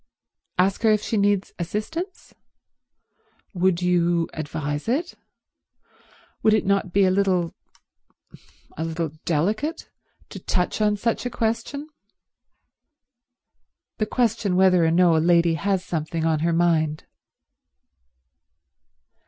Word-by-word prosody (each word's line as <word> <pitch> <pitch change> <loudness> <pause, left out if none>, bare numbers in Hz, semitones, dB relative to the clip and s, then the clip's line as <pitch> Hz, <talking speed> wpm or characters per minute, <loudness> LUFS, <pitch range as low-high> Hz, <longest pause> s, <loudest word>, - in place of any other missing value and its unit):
"Ask 190 +2 +2
her 225 - +4
if 215 -1 +2
she - - -2
needs 200 -1 +1
assistance? 215 - -5 1.2
Would 180 -1 +1
you 175 -1 +2
advise 145 0 -4
it? 310 +9 -1 1.3
Would 215 0 +4
it 215 - 0
not 195 -2 +1
be 195 +1 +4
a 185 - +3
little—a 185 -3 +1 1.3
little 165 -1 -3
delicate 210 - -1 0.4
to - - -8
touch 180 +3 -1
on 210 -1 +2
such 230 +3 -1
a - - -3
question, 230 +6 -2 2.1
the 215 - 0
question 225 -5 0
whether 185 -2 +4
or 165 - +3
no 170 0 +4
a - - +3
lady 170 0 +3
has 190 +2 -1
something 160 0 -3
on 160 -2 +1
her 170 +2 +1
mind?" 160 -3 +1
185 Hz, 110 wpm, -23 LUFS, 165-215 Hz, 2.1 s, her